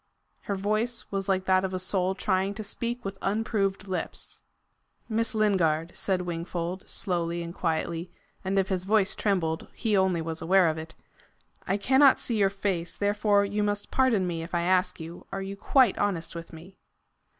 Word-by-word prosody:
Her 200 - -1
voice 215 +5 -1
was 195 -1 -2
like 190 -1 +1
that 185 0 +3
of 190 -1 -2
a - - 0
soul 185 0 0
trying 195 0 0
to 215 - -5
speak 235 +3 -4
with 195 0 -5
unproved 200 -1 0
lips. 185 -2 -3 0.7
"Miss 225 0 -1
Lingard," 175 -6 +2
said 185 -2 0
Wingfold, 175 +1 -4
slowly 170 -2 -1
and 170 0 -6
quietly 170 0 -2 0.3
and 195 +1 -1
if 190 -1 +2
his 185 -2 0
voice 205 -1 +2
trembled, 165 -6 0
he 220 -3 0
only 190 -3 +3
was 165 0 -3
aware 185 0 +4
of 160 0 -2
it, 160 0 -9 0.7
"I 195 - +1
cannot 265 +6 +5
see 230 - -1
your 200 -2 +4
face, 195 -3 -3
therefore 205 0 +2
you 205 +1 -1
must 205 0 -1
pardon 245 -8 +3
me 170 -2 -2
if 170 +2 -5
I 170 - +1
ask 180 +1 +2
you 165 +2 -9
are 195 - -3
you 195 +1 -5
quite 245 +2 +3
honest 175 -5 -1
with 170 -1 -8
me?" 170 +4 -13
190 Hz, 180 wpm, -27 LUFS, 175-205 Hz, 0.7 s, cannot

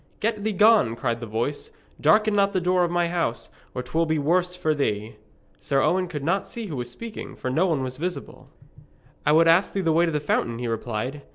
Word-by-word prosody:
'Get 215 -1 -1
thee 220 - 0
gone,' 205 - +4
cried 120 -1 -2
the 120 - -7
voice, 115 +7 -3 0.3
'darken 215 0 +4
not 200 0 +2
the 185 - +2
door 180 0 +2
of 175 - +1
my 175 0 +1
house, 170 -9 -2 0.2
or 125 - -3
'twill 160 +6 0
be 160 0 +1
worse 180 +5 +1
for 160 -3 0
thee.' 110 -6 -2 0.4
Sir 135 -1 0
Owen 185 +1 +1
could 150 -5 -6
not 190 +6 0
see 230 -1 -6
who 165 -8 -5
was 120 -1 -4
speaking, 210 - -8
for 130 - -4
no 165 +8 +2
one 155 -6 0
was 130 0 -4
visible. 175 +4 -6 0.8
'I - - +5
would 165 +1 +5
ask 170 +4 +4
thee 195 - -1
the 165 -3 +1
way 170 +2 +3
to - - 0
the 150 - 0
fountain,' 120 -5 -1
he 120 0 -4
replied. 115 +5 -3
160 Hz, 225 wpm, -24 LUFS, 130-185 Hz, 0.8 s, I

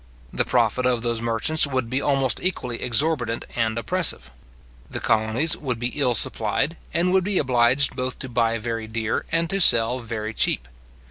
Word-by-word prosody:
The - - -1
profit 125 0 0
of 120 -2 -1
those 115 -1 -2
merchants 120 +7 +1
would 130 -4 -3
be 130 +4 -2
almost 135 -4 +1
equally 125 -10 -3
exorbitant 120 -2 0
and 115 -1 -2
oppressive. 115 - 0 0.6
The - - -4
colonies 110 +8 +1
would 130 -5 -5
be 120 +1 -3
ill 125 -3 0
supplied, 115 +9 +3 0.2
and 180 +2 0
would 190 -1 +2
be 200 0 -2
obliged 130 0 +2
both 125 0 -4
to - - -6
buy 115 -2 -1
very 115 0 -5
dear, 110 0 -4
and 165 0 0
to 195 0 0
sell 120 -4 +5
very 110 -2 -6
cheap. 65 -10 0
120 Hz, 175 wpm, -22 LUFS, 115-140 Hz, 0.6 s, sell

